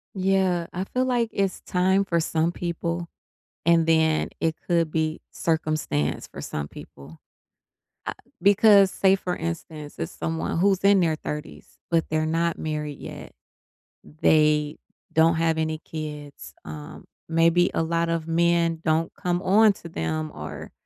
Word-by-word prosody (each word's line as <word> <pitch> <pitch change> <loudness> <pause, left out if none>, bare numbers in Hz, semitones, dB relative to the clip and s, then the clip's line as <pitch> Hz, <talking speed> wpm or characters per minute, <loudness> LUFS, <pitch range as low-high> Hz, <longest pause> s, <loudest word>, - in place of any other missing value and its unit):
Yeah. 190 -2 +1
I 185 - -2
feel 255 +5 -1
like 240 -3 +1
it's 195 -1 -1
time 190 +2 +2
for 170 -3 +1
some 165 +1 0
people, 170 0 -3 0.6
and 170 -1 +4
then 160 -1 +2
it 160 -1 0
could 170 -3 +2
be 160 0 -1
circumstance 155 - -1
for - - -9
some 75 -1 -4
people. 75 +2 -13 0.9
Ah - - -2 0.3
because, 200 -1 +6
say, 195 0 +4
for 180 -2 -3
instance, 160 -2 -6
it's 80 - -4
someone 80 - -3
who's 195 0 +3
in 200 0 +5
their 165 -3 +2
30s, 150 0 -7
but 165 -1 +2
they're 155 0 0
not 165 +1 0
married 150 -2 -4
yet. - - -9 0.9
They 150 -1 +3 0.4
don't 165 +1 +4
have 165 0 +1
any 160 0 -1
kids. 150 - -8
Um, 75 -1 -9 0.2
maybe 165 +2 +3
a - - +1
lot 165 +1 0
of 165 -1 -2
men 170 0 +2
don't 160 +1 +1
come 180 -3 -1
on 205 +3 +5
to 170 - -11
them 80 - -3
or - - -8
165 Hz, 145 wpm, -25 LUFS, 155-180 Hz, 0.9 s, because